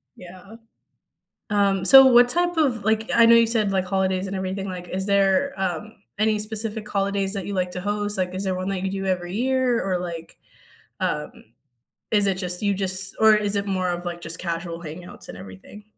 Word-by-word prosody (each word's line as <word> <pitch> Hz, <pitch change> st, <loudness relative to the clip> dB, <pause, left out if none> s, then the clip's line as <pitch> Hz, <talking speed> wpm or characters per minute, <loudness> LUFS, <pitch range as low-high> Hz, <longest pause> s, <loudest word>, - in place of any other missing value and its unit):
Yeah. 185 Hz, +4 st, -13 dB, 1.0 s
Um, 200 Hz, -2 st, +1 dB
so 270 Hz, +6 st, +9 dB
what 245 Hz, -1 st, +6 dB
type 350 Hz, +4 st, 0 dB
of, 255 Hz, -9 st, 0 dB
like 220 Hz, +1 st, 0 dB
I 230 Hz, -, +6 dB
know 230 Hz, 0 st, +7 dB
you 230 Hz, 0 st, +5 dB
said, 220 Hz, -3 st, +1 dB
like, 190 Hz, -1 st, 0 dB
holidays 190 Hz, 0 st, -1 dB
and 195 Hz, -, -6 dB
everything, 190 Hz, +1 st, -4 dB
like, 180 Hz, -1 st, -7 dB
is 190 Hz, +2 st, -3 dB
there, 200 Hz, +7 st, +2 dB
um, 190 Hz, +3 st, -3 dB, 0.3 s
any 215 Hz, 0 st, +1 dB
specific 215 Hz, 0 st, -1 dB
holidays 195 Hz, -1 st, -1 dB
that 195 Hz, -2 st, -5 dB
you 200 Hz, -, -4 dB
like 180 Hz, -1 st, -1 dB
to 180 Hz, -, -5 dB
host? 205 Hz, +1 st, -1 dB
Like, 185 Hz, -1 st, -2 dB
is 190 Hz, +2 st, -3 dB
there 190 Hz, -1 st, -1 dB
one 185 Hz, +1 st, -4 dB
that 185 Hz, -2 st, -3 dB
you 190 Hz, -, -2 dB
do 195 Hz, 0 st, -4 dB
every 180 Hz, -1 st, -2 dB
year, 255 Hz, 0 st, 0 dB
or 185 Hz, -2 st, 0 dB
like, 170 Hz, -2 st, -8 dB, 0.6 s
um, -, -, -2 dB, 0.8 s
is 205 Hz, -2 st, +4 dB
it 190 Hz, -, 0 dB
just 180 Hz, -1 st, 0 dB
you 200 Hz, -1 st, +1 dB
just 190 Hz, 0 st, -1 dB
or 220 Hz, 0 st, +6 dB
is 205 Hz, -1 st, +1 dB
it 200 Hz, -, -2 dB
more 185 Hz, -2 st, -1 dB
of, 175 Hz, 0 st, -4 dB
like, 175 Hz, -1 st, -5 dB
just 165 Hz, 0 st, -5 dB
casual 170 Hz, -1 st, -5 dB
hangouts 170 Hz, +3 st, -10 dB
and -, -, -9 dB
everything? 95 Hz, -, -13 dB
195 Hz, 205 wpm, -23 LUFS, 185-215 Hz, 1.0 s, so